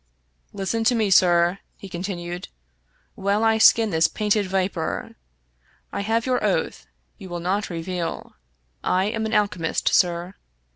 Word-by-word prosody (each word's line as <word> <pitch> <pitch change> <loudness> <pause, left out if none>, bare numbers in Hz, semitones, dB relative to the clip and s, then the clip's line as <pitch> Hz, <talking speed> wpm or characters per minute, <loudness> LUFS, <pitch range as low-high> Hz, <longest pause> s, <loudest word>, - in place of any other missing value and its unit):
" - - -45
Listen 205 +3 -2
to 245 - +4
me, 215 -3 +1
sir," 175 0 +4 0.2
he 195 - -10
continued, 175 -1 -5 0.4
" - - -45 0.3
while 200 +3 0
I 225 0 +3
skin 220 -1 +5
this 160 -1 +3
painted 210 -1 0
viper. 185 -3 -2 0.8
I - - -2
have 225 +3 0
your 255 -1 0
oath; - - -1 0.3
you 190 -3 -10
will 175 0 -4
not 190 +5 -1
reveal. 175 0 -4 0.5
I 185 +1 +1
am 220 +1 -2
an 220 - -5
alchemist, 200 -6 0
sir. 175 0 +2
190 Hz, 150 wpm, -23 LUFS, 175-215 Hz, 0.8 s, skin